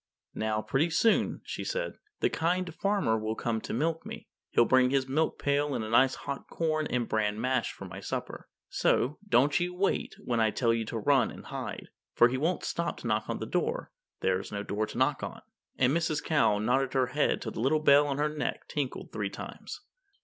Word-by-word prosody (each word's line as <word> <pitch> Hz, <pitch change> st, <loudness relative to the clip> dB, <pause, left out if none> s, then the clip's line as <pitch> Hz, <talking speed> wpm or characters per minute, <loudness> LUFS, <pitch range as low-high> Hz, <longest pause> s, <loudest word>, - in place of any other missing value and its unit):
"Now, 110 Hz, 0 st, -1 dB
pretty 135 Hz, -, +1 dB
soon," 220 Hz, +7 st, +2 dB
she -, -, -5 dB
said, -, -, -3 dB, 0.2 s
"the -, -, +3 dB
Kind 175 Hz, +1 st, 0 dB
Farmer 195 Hz, -, +1 dB
will 110 Hz, +1 st, -2 dB
come 110 Hz, -1 st, -2 dB
to -, -, -6 dB
milk 160 Hz, +6 st, 0 dB
me. -, -, -8 dB, 0.2 s
He'll 120 Hz, -, +4 dB
bring 130 Hz, +1 st, +4 dB
his 135 Hz, 0 st, +1 dB
milk 155 Hz, +4 st, 0 dB
pail 140 Hz, 0 st, +1 dB
and 110 Hz, -, -2 dB
a 110 Hz, -, -6 dB
nice 130 Hz, +2 st, +5 dB
hot 140 Hz, -, -6 dB
corn 155 Hz, -2 st, 0 dB
and 120 Hz, -2 st, -1 dB
bran 105 Hz, -1 st, 0 dB
mash 130 Hz, 0 st, 0 dB
for -, -, -10 dB
my -, -, -8 dB
supper. -, -, -5 dB, 0.2 s
So, 140 Hz, +5 st, +1 dB
don't 145 Hz, +1 st, +4 dB
you 180 Hz, 0 st, -2 dB
wait 195 Hz, +2 st, 0 dB
when 120 Hz, -2 st, -2 dB
I 110 Hz, -1 st, +4 dB
tell 115 Hz, +2 st, +1 dB
you 115 Hz, -1 st, -1 dB
to 115 Hz, -, -4 dB
run 130 Hz, +3 st, +3 dB
and -, -, -10 dB
hide. -, -, -6 dB, 0.3 s
For 120 Hz, -, +6 dB
he 130 Hz, -, -1 dB
won't 165 Hz, +7 st, 0 dB
stop 170 Hz, 0 st, -2 dB
to -, -, -4 dB
knock 110 Hz, -1 st, 0 dB
on -, -, -1 dB
the -, -, -4 dB
door -, -, -2 dB, 0.3 s
there's 95 Hz, 0 st, 0 dB
no 100 Hz, 0 st, -3 dB
door 105 Hz, +2 st, -2 dB
to 110 Hz, -, -8 dB
knock 130 Hz, +2 st, +2 dB
on." -, -, -6 dB, 0.3 s
And 130 Hz, +3 st, +3 dB
Mrs. 160 Hz, -2 st, 0 dB
Cow 145 Hz, -9 st, +3 dB
nodded 125 Hz, +5 st, +1 dB
her 130 Hz, -1 st, +3 dB
head 145 Hz, -, +2 dB
till 110 Hz, -, -5 dB
the -, -, -7 dB
little 135 Hz, +5 st, +3 dB
bell 145 Hz, -1 st, +5 dB
at 135 Hz, -, -1 dB
her 150 Hz, +1 st, +1 dB
neck 150 Hz, -, -3 dB
tinkled 140 Hz, -4 st, -3 dB
three -, -, -2 dB
times. -, -, -8 dB
130 Hz, 215 wpm, -29 LUFS, 115-155 Hz, 0.3 s, For